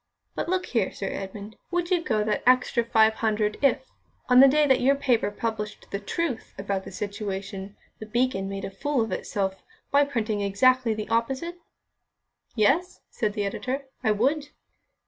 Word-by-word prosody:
But -, -, -3 dB
look 370 Hz, 0 st, 0 dB
here, 225 Hz, -6 st, 0 dB
Sir 195 Hz, -, -4 dB
Edmund, 200 Hz, +2 st, -7 dB
would 350 Hz, 0 st, -1 dB
you 350 Hz, -2 st, +2 dB
go 215 Hz, -7 st, +1 dB
that 210 Hz, -1 st, 0 dB
extra 250 Hz, -1 st, +4 dB
five 220 Hz, -1 st, +4 dB
hundred 215 Hz, -1 st, 0 dB
if, 285 Hz, -, +2 dB, 0.4 s
on 250 Hz, 0 st, +7 dB
the 270 Hz, -, +10 dB
day 300 Hz, +2 st, +4 dB
that 265 Hz, -3 st, +3 dB
your 275 Hz, +3 st, +4 dB
paper 250 Hz, -6 st, +1 dB
published 210 Hz, 0 st, -5 dB
the 200 Hz, -, -2 dB
truth 260 Hz, -, -3 dB
about 195 Hz, -1 st, -3 dB
the -, -, -8 dB
situation, 200 Hz, -1 st, -5 dB, 0.2 s
The 215 Hz, -, -8 dB
Beacon 225 Hz, -4 st, 0 dB
made 195 Hz, 0 st, -4 dB
a -, -, -6 dB
fool 275 Hz, +6 st, -1 dB
of 225 Hz, -2 st, -2 dB
itself 190 Hz, 0 st, -2 dB, 0.3 s
by 285 Hz, 0 st, +5 dB
printing 220 Hz, -6 st, -2 dB
exactly 230 Hz, +4 st, +3 dB
the 215 Hz, 0 st, -4 dB
opposite?" 270 Hz, +10 st, -1 dB, 1.0 s
"Yes," 285 Hz, -, +2 dB
said 215 Hz, -4 st, -1 dB
the 205 Hz, -1 st, -1 dB
editor, 265 Hz, +7 st, -3 dB
"I 215 Hz, -, +3 dB
would." 280 Hz, +8 st, +1 dB
225 Hz, 170 wpm, -26 LUFS, 205-270 Hz, 1.0 s, the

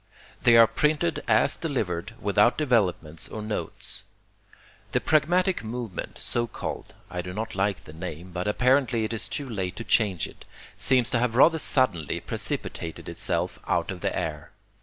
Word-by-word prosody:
They 115 Hz, -1 st, +6 dB
are 115 Hz, -, +10 dB
printed 150 Hz, -, +1 dB
as -, -, +4 dB
delivered, 110 Hz, -, -3 dB
without 105 Hz, +3 st, +3 dB
developments 95 Hz, -, 0 dB
or 110 Hz, -, -6 dB
notes. 105 Hz, 0 st, -4 dB, 0.9 s
The -, -, +3 dB
pragmatic 175 Hz, +4 st, +2 dB
movement, 115 Hz, -3 st, -5 dB
so 120 Hz, 0 st, +1 dB
called -, -, -6 dB, 0.2 s
I 90 Hz, 0 st, -2 dB
do 90 Hz, +1 st, -7 dB
not 110 Hz, +3 st, -4 dB
like 95 Hz, 0 st, 0 dB
the 75 Hz, -, -12 dB
name, 85 Hz, +1 st, -7 dB
but 90 Hz, +2 st, -3 dB
apparently 125 Hz, +1 st, +3 dB
it 110 Hz, -, -2 dB
is 115 Hz, -, -4 dB
too 145 Hz, -, -4 dB
late 95 Hz, -6 st, -3 dB
to 115 Hz, -, -5 dB
change 100 Hz, -7 st, +2 dB
it -, -, -14 dB, 0.3 s
seems 125 Hz, -2 st, +2 dB
to 120 Hz, -, +2 dB
have 120 Hz, -1 st, 0 dB
rather 160 Hz, +5 st, +6 dB
suddenly 105 Hz, -, +1 dB
precipitated 80 Hz, -1 st, -4 dB
itself -, -, -2 dB
out -, -, +1 dB
of -, -, -7 dB
the -, -, -1 dB
air. 75 Hz, -1 st, -3 dB
110 Hz, 160 wpm, -26 LUFS, 90-125 Hz, 0.9 s, are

